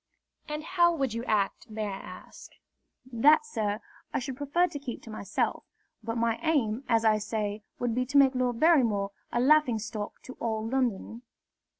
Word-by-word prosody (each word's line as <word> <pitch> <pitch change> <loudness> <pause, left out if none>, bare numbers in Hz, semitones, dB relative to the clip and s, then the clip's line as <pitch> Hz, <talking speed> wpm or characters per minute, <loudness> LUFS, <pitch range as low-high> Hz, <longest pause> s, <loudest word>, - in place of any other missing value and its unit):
"And 300 0 -4
how 345 0 +3
would 270 -6 -1
you 230 +1 -3
act, 215 +1 0
may 215 0 -3
I 200 -2 -3
ask?" - - -12 0.6
"That, 300 - +5
sir, 215 - -2 0.3
I - - -1
should 265 0 -4
prefer 290 +6 +1
to 295 -5 -6
keep 260 -4 -7
to 225 - -10
myself; 205 -2 -2 0.4
but 230 +1 -3
my 230 -1 +1
aim, 270 -7 +1
as 230 -1 +3
I 215 -1 +4
say, 210 -1 -3 0.2
would 245 -2 -1
be 250 +2 -1
to 285 +2 +1
make 275 -1 +6
Lord 250 -2 0
Barrymore 235 -12 +3 0.2
a 240 - 0
laughing 270 -2 +4
stock 215 -1 -6
to 255 - -9
all 220 -1 -2
London." 235 -3 -1
235 Hz, 180 wpm, -28 LUFS, 220-280 Hz, 0.6 s, make